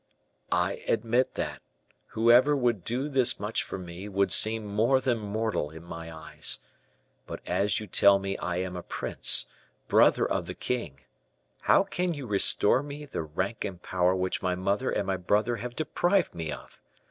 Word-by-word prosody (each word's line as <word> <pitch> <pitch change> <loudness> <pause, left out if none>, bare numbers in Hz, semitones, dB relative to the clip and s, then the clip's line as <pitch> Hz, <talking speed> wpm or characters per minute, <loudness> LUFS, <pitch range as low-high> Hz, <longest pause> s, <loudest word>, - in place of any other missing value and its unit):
"I - - 0
admit 120 +3 +1
that, - - -4 0.5
whoever 120 +6 +4
would 120 -8 0
do 125 +7 -2
this 135 -4 +2
much 105 +2 -1
for - - -6
me, 90 +2 -8
would 100 0 +1
seem 110 0 +1
more 110 +6 +2
than 125 -3 0
mortal 105 -6 -2
in 80 +2 -11
my 85 -1 -8
eyes; 80 -1 -1 0.7
but - - -6
as 100 +1 +1
you 110 - -6
tell 100 +1 +5
me 100 0 -3
I 90 - -3
am 90 0 -3
a 90 - -5
prince, - - +2 0.4
brother - - +4
of - - -2
the - - -6
king, 80 - -4 0.6
how - - +4
can 180 -3 -2
you 140 -3 -6
restore 105 +2 +4
me 145 +1 -8
the 140 - -4
rank 90 +8 -3
and 90 -3 -5
power 90 +1 +1
which 95 0 -2
my 90 -1 0
mother 100 +7 -1
and 100 - -1
my 95 0 -1
brother 105 +6 +1
have 120 +1 -6
deprived 175 +4 +1
me 80 -3 -4
of? - - -10
105 Hz, 175 wpm, -28 LUFS, 90-125 Hz, 0.7 s, tell